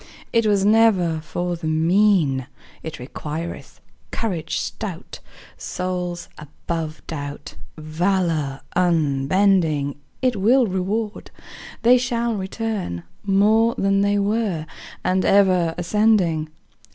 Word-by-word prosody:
It 230 -1 +3
was 200 -2 +2
never 205 -7 +4
for 175 +2 -3
the 165 -1 -5
mean; 160 -4 +2 0.3
It 160 - -7
requireth 155 +6 -7 0.3
courage 175 -8 -3
stout. 195 -5 -5 0.4
Souls 180 -1 -4
above 155 +1 -6
doubt, 145 -2 -6 0.2
Valor 155 -3 -1
unbending, 160 -2 +2 0.2
It 255 -2 +2
will 235 +6 +4
reward, 205 +3 -3 0.5
They 245 +2 +6
shall 235 -1 -1
return 195 - -3 0.2
More 215 +4 +3
than 195 0 +2
they 205 0 +2
were, 200 -5 0 0.4
And 185 +1 +1
ever 185 -4 +3
ascending. 175 -4 +2
185 Hz, 100 wpm, -22 LUFS, 160-210 Hz, 0.5 s, They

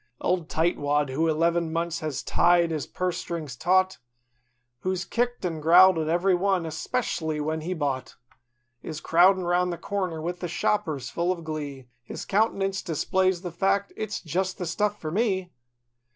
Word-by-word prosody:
Old 175 -3 -1
Tightwad, 150 -3 +1
who 160 +5 +1
eleven 165 +1 +1
months 165 0 -1
has 155 -4 -4
tied 175 -1 +3
his 155 -3 -3
purse 180 -1 -2
strings 155 -7 -5
taut; 185 +4 +2 0.8
Who's 185 +4 -2
kicked 240 -2 -1
an' 165 -3 -2
growled 175 +2 +7
at 155 - -1
every 175 +4 +2
one, 190 0 +1
espec'ly 160 -2 -2
when 155 +1 -2
he 180 +4 -3
bought; 140 -5 -3 0.7
Is 155 -2 -6
crowdin' 185 +4 +4
'round 175 +1 +1
the 170 - -4
counter, 185 -5 -3
with 175 +3 -4
the 175 - -3
shoppers, 160 - -1
full 170 +1 0
of 175 -2 -4
glee— 145 -5 -6
His 120 - -7
countenance 195 -2 +1
displays 185 +2 0
the 175 - -4
fact—"It's 200 +4 -1
just 185 +3 -2
the 180 - -4
stuff 205 +4 -1
for 155 - -4
me." 190 -3 0
175 Hz, 160 wpm, -26 LUFS, 160-185 Hz, 0.8 s, growled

